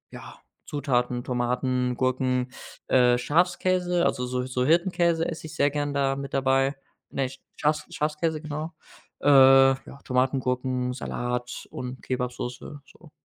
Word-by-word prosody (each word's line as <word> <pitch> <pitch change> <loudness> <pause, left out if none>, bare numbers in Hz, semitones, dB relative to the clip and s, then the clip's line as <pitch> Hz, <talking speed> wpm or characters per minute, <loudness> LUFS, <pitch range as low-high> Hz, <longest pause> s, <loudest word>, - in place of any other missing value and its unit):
ja, - - -11 0.3
Zutaten 125 -4 -1
Tomaten, 125 0 0
Gurken, 130 0 0 0.4
äh, 125 -1 +4
Schafskäse, 180 +4 +1
also 125 -1 0
so 125 0 -2
so 125 -1 -1
Hirtenkäse 170 +1 +2
esse 160 -1 -6
ich 160 - -10
sehr 145 +1 +3
gern 145 0 -2
da 135 -1 +1
mit 140 0 -7
dabei 135 +1 +2 0.3
ne 135 -2 -1 0.3
Schafs 150 +1 0
Schafskäse, 155 +1 -1
genau, 155 +2 -5 0.5
äh, - - -1
ja, 135 0 +6
Tomaten, 130 +1 +1
Gurken, 125 0 -1
Salat 125 0 -4
und 125 +1 -6
Kebabsoße, 125 +2 -4
so. 155 +1 -18
135 Hz, 130 wpm, -26 LUFS, 125-150 Hz, 0.5 s, ja